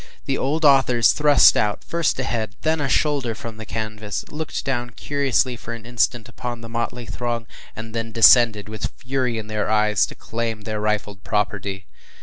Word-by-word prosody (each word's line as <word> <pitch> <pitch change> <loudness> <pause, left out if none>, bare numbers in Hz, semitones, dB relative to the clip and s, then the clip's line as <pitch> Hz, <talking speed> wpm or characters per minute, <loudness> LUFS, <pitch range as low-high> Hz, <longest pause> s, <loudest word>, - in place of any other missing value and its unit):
The 135 - 0
old 150 +5 0
authors 130 -4 +5
thrust 150 -1 +6
out, 105 -1 0
first 170 -4 -1
a - - 0
head, 110 -4 -3
then 160 -1 +1
a 135 - -1
shoulder, 140 -7 +1
from 115 0 -8
the 110 -1 -9
canvas, 110 -2 -4
looked 155 0 -4
down 120 -3 -1
curiously 135 0 0
for 115 0 -7
an 115 -2 -12
instant 120 -1 0
upon 120 0 -6
the 115 - -9
motley 120 +1 -3
throng, 120 0 -3 0.3
and 110 0 -8
then 115 -1 -3
descended, 115 -2 +6
with 110 -1 -4
fury 130 -3 -2
in 110 - -5
their 110 -1 -2
eyes, 105 -1 +3
to - - -11
claim 115 -1 -4
their 105 0 -4
rifled 105 -1 -2
property. 100 -2 -2
115 Hz, 180 wpm, -22 LUFS, 110-130 Hz, 0.3 s, thrust